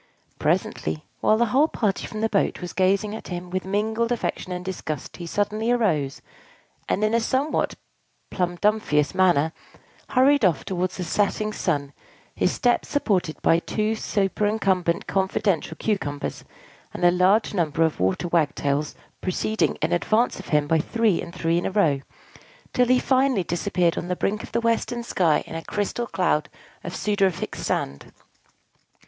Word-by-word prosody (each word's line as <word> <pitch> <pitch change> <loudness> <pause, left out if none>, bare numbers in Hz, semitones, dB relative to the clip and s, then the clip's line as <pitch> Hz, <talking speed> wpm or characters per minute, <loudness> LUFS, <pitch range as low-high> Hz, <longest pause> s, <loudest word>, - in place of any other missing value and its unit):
Presently, 80 0 -1
while 215 - +3
the 235 - +3
whole 285 +4 +5
party 210 -10 -1
from 215 - -6
the 225 - +3
boat 200 - +1
was 180 -1 -6
gazing 195 +3 +2
at 220 - -7
him 175 0 -6
with 185 0 -2
mingled 220 +4 0
affection 230 -5 -2
and 180 0 -4
disgust, 155 -6 -5
he 170 - -7
suddenly 210 +5 -1
arose, 170 - +1 0.7
and, 210 - +1
in 215 +1 +2
a 230 - +4
somewhat 265 +6 0 0.6
plumdomphious 175 -4 +1
manner, 175 -4 +3 0.6
hurried 275 +1 +4
off 165 -8 +2
towards 185 -1 -2
the 185 - -3
setting 210 +4 0
sun, 145 -8 -1 0.4
his - - +1
steps 245 -1 +1
supported 185 - 0
by 165 - +4
two 215 +5 -1
superincumbent 195 -4 0
confidential 190 -4 0
Cucumbers, 145 -10 -3 0.5
and - - -4
a 175 - +7
large 185 +6 +3
number 165 -4 +1
of 160 -1 0
Waterwagtails 145 - 0 0.3
proceeding 215 +4 0
in 160 - +1
advance 215 +7 +1
of 190 - -9
him 150 -1 +2
by 160 +2 +2
three 220 +2 +1
and - - -7
three 170 -1 0
in - - -2
a - - -3
row, 165 -9 +2 0.7
till 250 -1 +3
he 255 +1 +5
finally 260 -5 +2
disappeared 175 0 0
on 175 - -6
the 180 - -1
brink 210 +4 -1
of - - -10
the 235 - 0
western 230 +1 0
sky 170 -9 +2
in - - -10
a 165 0 -5
crystal 210 +6 -2
cloud 170 -7 0 0.3
of 175 - -5
sudorific 195 -4 0
sand. 70 0 -3
190 Hz, 155 wpm, -24 LUFS, 170-215 Hz, 0.7 s, a